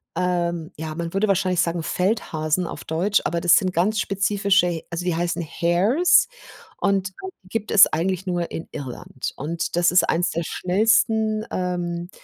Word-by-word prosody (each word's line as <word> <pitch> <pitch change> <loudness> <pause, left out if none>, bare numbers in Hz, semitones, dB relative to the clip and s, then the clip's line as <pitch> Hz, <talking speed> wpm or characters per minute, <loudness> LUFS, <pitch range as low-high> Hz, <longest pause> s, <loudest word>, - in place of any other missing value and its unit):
ähm 175 -2 -1
ja, 155 0 -5
man 170 0 -5
würde 210 +2 +2
wahrscheinlich 185 -2 +1
sagen 170 -1 -1
Feldhasen 180 -4 -1
auf - - -8
Deutsch, 185 +6 +1
aber 170 0 -1
das 175 0 +6
sind 185 -3 0
ganz 210 +6 +1
spezifische 200 -2 +2
He 165 -2 -4
also, 170 +1 -3
die 175 -2 0
heißen 175 0 -1
Hares 200 - +3 0.5
und 195 -1 0 0.4
gibt 215 +3 -4
es 205 -1 +8
eigentlich 185 +3 -2
nur 175 -1 -2
in 165 - -6
Irland. 130 -1 -6
Und 165 +4 -3
das 175 0 +3
ist 180 - +5
eines 175 +2 +1
der 170 +1 -2
schnellsten, 215 +2 +1
ähm, 175 -1 -3
180 Hz, 160 wpm, -22 LUFS, 170-195 Hz, 0.5 s, es